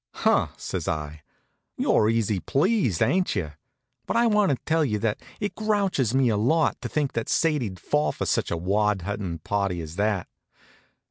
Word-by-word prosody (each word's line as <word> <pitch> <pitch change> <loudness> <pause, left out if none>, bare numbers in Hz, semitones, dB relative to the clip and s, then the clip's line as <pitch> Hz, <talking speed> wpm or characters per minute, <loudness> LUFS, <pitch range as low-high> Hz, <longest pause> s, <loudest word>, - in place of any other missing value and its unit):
"Huh!" - - +2
says - - -4
I. 75 -1 -3 0.6
"You're 105 - +3
easy 110 -3 +1
pleased, 145 - +1
ain't 185 -6 +1
you? 80 -6 -2 0.6
But - - 0
I 235 - +4
want 210 -4 +3
to 140 - +1
tell 160 0 +2
you 110 -7 0
that 105 0 -1 0.2
it 205 -1 -2
grouches 200 - 0
me 135 -1 +4
a 105 - +1
lot 155 +10 +1
to - - -4
think 145 -3 -1
that 115 -1 -3
Sadie'd 130 - 0
fall 75 -1 +1
for - - -5
any - - -1
such - - 0
wad 100 +3 0
huntin' 100 -3 -3
party 100 -3 -1
as 80 +1 -7
that." 105 -3 0
110 Hz, 180 wpm, -25 LUFS, 95-160 Hz, 0.6 s, I